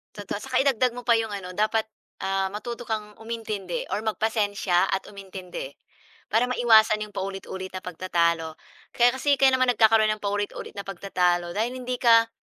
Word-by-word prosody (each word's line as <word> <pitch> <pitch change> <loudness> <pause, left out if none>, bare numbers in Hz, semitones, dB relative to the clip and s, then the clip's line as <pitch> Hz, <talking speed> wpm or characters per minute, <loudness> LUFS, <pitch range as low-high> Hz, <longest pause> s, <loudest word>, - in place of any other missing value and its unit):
Totoo. 205 -1 -5
Saka 255 +4 0
idagdag 255 -3 +2
mo 245 - -7
pa 235 -2 +3
'yong 220 -2 -2
ano 185 -2 -6
dapat, 220 +1 +1 0.3
ah, 195 0 0
matuto 235 +2 -6
kang 210 -1 -4
umintindi 220 -5 -5
or 205 +3 -3
magpasensya 205 -4 +1
at 190 - -2
umintindi. 190 -7 -8 0.6
Para 225 +4 +3
maiwasan 220 -3 +4
'yong 205 - -16
paulit-ulit 190 -1 -5
na 185 - -5
pagtatalo. 170 -2 0 0.4
Kaya 240 0 +5
kasi 285 +1 +2
kaya 265 -1 +5
naman 255 -1 +3
nagkakaroon 220 -1 +4
ng 215 - -10
paulit-ulit 205 0 -3
na 200 - -5
pagtatalo, 180 -2 0
dahil 235 +3 0
hindi 250 0 -3
ka 230 -2 +5
210 Hz, 165 wpm, -25 LUFS, 190-230 Hz, 0.6 s, Kaya